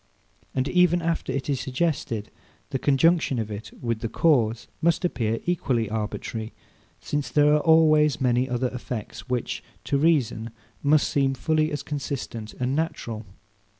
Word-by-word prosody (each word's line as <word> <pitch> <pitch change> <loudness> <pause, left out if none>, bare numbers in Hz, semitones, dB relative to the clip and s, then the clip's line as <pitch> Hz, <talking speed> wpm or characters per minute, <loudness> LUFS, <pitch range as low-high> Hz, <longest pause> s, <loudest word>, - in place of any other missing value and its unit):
And 130 +1 +1
even 180 0 +4
after 165 -1 -1
it 135 -1 -3
is 140 -3 0
suggested, 130 -6 -2 0.4
the 135 - -1
conjunction 145 0 +3
of 110 -2 -3
it 105 +2 -6
with 115 -2 -2
the 115 - -3
cause 115 -6 +2
must 170 +2 +2
appear 115 -8 0
equally 130 -11 0
arbitrary; 110 +1 -4 0.5
since 145 -3 -2
there 150 +3 +4
are 150 - +4
always 155 -3 +5
many 125 0 +2
other 125 +1 0
effects, 125 -1 -6
which, 125 -2 -2 0.2
to 140 - 0
reason, 135 -8 +2 0.3
must 150 +1 +4
seem 135 -1 +1
fully 155 +3 +1
as 145 - -3
consistent 130 -6 -5
and 125 +2 -1
natural. 115 -9 -3
135 Hz, 150 wpm, -25 LUFS, 115-155 Hz, 0.5 s, always